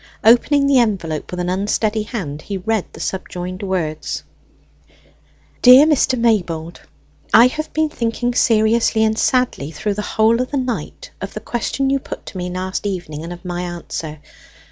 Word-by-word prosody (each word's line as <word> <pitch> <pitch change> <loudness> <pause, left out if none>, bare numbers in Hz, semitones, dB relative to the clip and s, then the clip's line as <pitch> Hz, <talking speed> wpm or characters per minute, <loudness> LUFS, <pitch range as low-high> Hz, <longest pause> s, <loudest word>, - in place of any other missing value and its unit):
Opening 260 +5 +5
the 280 -2 +4
envelope 175 -10 -1
with 180 - -5
an 180 - -2
unsteady 210 +3 0
hand, 185 - -5
he 200 +3 -5
read 215 +1 -1
the - - -12
subjoined 185 0 -5
words: 160 -6 -3 1.4
"DEAR 255 +3 +9
MR. 285 -4 +2
MAYBOLD, 175 -8 0 0.5
I 230 - +9
have 310 +5 -2
been 315 0 +1
thinking 240 -2 -2
seriously 220 -1 +3
and 220 0 +2
sadly 250 - +1
through 200 +7 -3
the 210 - -3
whole 220 +3 +2
of 255 - -3
the 285 - -2
night 260 - -4
of - - -6
the - - -3
question 270 +3 -2
you 275 - +2
put - - -8
to - - -8
me 180 0 -3
last 185 +2 -3
evening 175 -6 -5
and 170 - -7
of 175 +1 -10
my 175 0 -3
answer. 170 -3 -6
210 Hz, 165 wpm, -19 LUFS, 180-245 Hz, 1.4 s, DEAR